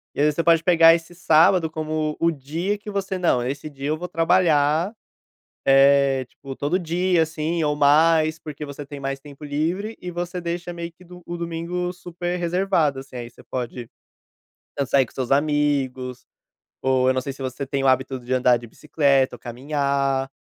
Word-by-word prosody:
e - - 0
aí 150 - +4
você 150 - -1
pode 165 -1 +4
pegar 165 -2 +7
esse 165 +1 -7
sábado 165 +1 +4
como 155 -1 -2
o 170 0 +3
dia 165 +7 -3
que 210 +1 -10
você: 195 -1 -2
"Não, 125 -9 +2
esse 140 +4 -4
dia 140 -1 -6
eu 155 - 0
vou 180 - -5
trabalhar, 165 +1 +2 0.7
eh, 135 -1 +5
tipo, 135 +1 -10
todo 150 +8 0
dia, 175 0 +1
assim, 160 +1 -1
ou 150 -1 +1
mais", 155 +2 +4
porque 150 -1 -7
você 145 0 -8
tem 140 0 -9
mais 135 0 -3
tempo 145 +1 -13
livre 170 +10 -2
e 180 - -5
você 175 +1 -4
deixa 175 +1 -4
meio 170 0 -6
que 180 +2 -20
do 180 0 -13
o 175 0 -5
domingo 170 +1 -3
super 175 0 -5
reservado, 170 -5 +1
assim, 135 -1 -12
aí 120 -1 -6
você - - -18
pode 125 -1 -5 0.9
tanto 140 -2 -2
sair 135 -2 +4
com - - -19
os - - -25
seus 130 -1 -3
amigos 140 -4 0 0.6
ou, 130 -1 +2
eu 130 - +4
não 130 - 0
sei 140 0 -5
se 135 - -13
você 130 +1 -4
tem 135 0 -2
o - - +3
hábito 130 0 +1
de 125 +1 -10
andar 125 -1 +4
de 120 0 -11
bicicleta 140 0 +1
ou - - -16
caminhar. 135 +1 -1
150 Hz, 195 wpm, -23 LUFS, 135-170 Hz, 0.9 s, pegar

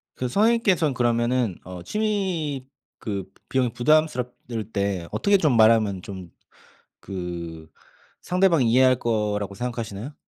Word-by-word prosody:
그 130 - -2
선생님께선 200 - +2
그러면은 120 -3 +1
어 90 -1 -8
취미 185 -11 -2 0.3
그 100 -4 -4 0.2
비용이 130 -2 +1
부담스럽 130 -2 +2
를 110 -2 -5
때 100 -4 -2
어떻게 200 -1 +3
좀 150 -9 +2
말하면 110 -4 +4
좀 95 -3 -9 0.7
그 85 -4 -6 0.5
상대방이 175 -9 +2
이해할 130 0 +5
거라고 105 -4 -1
생각하시나요? 115 +1 -5
120 Hz, 280 characters per minute, -24 LUFS, 100-150 Hz, 0.7 s, 이해할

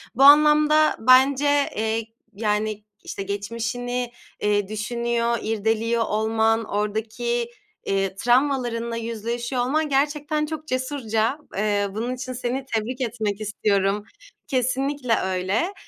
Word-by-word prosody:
Bu 270 - +3
anlamda 300 +1 +6
bence, 275 +4 +4
eee, 220 +1 -1 0.3
yani, 210 0 -1 0.2
işte, 195 - -5
geçmişini, 230 +4 -3 0.3
eee, 205 -1 +1
düşünüyor, 235 +2 -1
irdeliyor 225 +2 0
olman, 220 +1 +1
oradaki, 225 +3 -2 0.4
eee, 195 -1 0
travmalarınla 240 -1 +1
yüzleşiyor 235 +2 -3
olman 300 +5 0
gerçekten 295 +2 0
çok 310 0 -6
cesurca. 255 -2 -1 0.2
Eee, 205 -1 +1
bunun 235 +5 -3
için 255 0 -6
seni 255 +2 -3
tebrik 235 +4 -2
etmek 220 -3 -2
istiyorum. 205 -1 0 0.4
Kesinlikle 260 0 0
öyle, 190 - -1
235 Hz, 105 wpm, -23 LUFS, 215-260 Hz, 0.4 s, anlamda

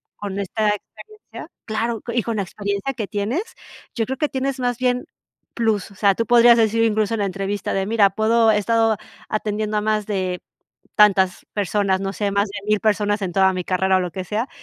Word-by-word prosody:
con 200 -1 -5
esta 210 +2 0
experiencia 425 - -8 0.2
claro, 225 +1 -2
y 235 -1 0
con 230 0 -3
la - - +1
experiencia 200 +5 -3
que 220 - -3
tienes, 220 - -2 0.5
yo 225 - -1
creo 265 - -3
que 305 - +1
tienes 265 0 -2
más 245 -1 -1
bien, 250 -1 0 0.5
plus. 220 -5 -1
O - - -16
sea, 200 0 +3
tú 230 - -1
podrías 235 0 +6
decir 225 0 +2
incluso 220 -1 +1
en - - -4
la 200 - +1
entrevista 195 +1 -3
de, 195 0 0
mira, 210 -1 +4
puedo 225 +3 +3
he 210 - +2
estado 225 +1 +2 0.3
atendiendo 215 0 -2
a - - +1
más 215 -1 0
de 185 -3 -2 0.6
tantas 190 -4 +4
personas, 200 -1 0
no 195 0 -2
sé, 205 0 -2
más 200 +1 +1
de 200 +1 -6
1000 215 0 +3
personas 210 -1 +1
en 185 -2 -2
toda 190 +1 +4
mi 180 -1 -3
carrera 190 +1 +2
o - - +2
lo 180 -1 -3
que 190 +2 -5
sea. 215 +7 -2
210 Hz, 210 wpm, -21 LUFS, 195-230 Hz, 0.6 s, podrías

